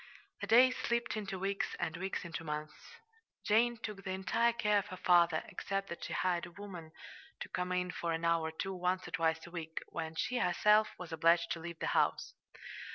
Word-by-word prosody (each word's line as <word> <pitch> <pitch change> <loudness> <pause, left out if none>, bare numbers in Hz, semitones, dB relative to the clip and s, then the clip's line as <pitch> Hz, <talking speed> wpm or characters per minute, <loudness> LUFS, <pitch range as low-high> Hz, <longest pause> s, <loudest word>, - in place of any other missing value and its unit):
The - - -3
days 255 +3 +6
slipped 235 -1 -1
into 205 -2 -4
weeks, 195 +1 -2
and 170 -2 -1
the 170 - -7
weeks 190 -1 -3
into 165 -1 -5
months. 150 0 -4 0.7
Jane 235 +3 +3
took 210 -3 -6
the - - -5
entire 190 +5 +2
care 210 -3 +2
of 200 - -6
her 185 -2 -7
father, 170 -3 +4
except 195 0 -3
that 170 - -6
she - - -5
hired 175 -2 0
a - - -13
woman 175 -4 -9 0.5
to - - -5
come 180 0 -2
in 180 0 0
for 170 -1 -3
an 165 +1 -1
hour 165 -1 +2
or - - -4
two 190 +4 -4
once 180 0 -1
or - - -9
twice 160 +1 0
a 170 - -11
week, 160 -2 -7
when 160 -1 -5
she 245 +9 -1
herself 210 +2 +4
was 180 -3 -8
obliged 165 +1 +3
to 170 - -2
leave 170 0 -7
the - - -3
house. - - +1
180 Hz, 215 wpm, -34 LUFS, 165-205 Hz, 0.7 s, days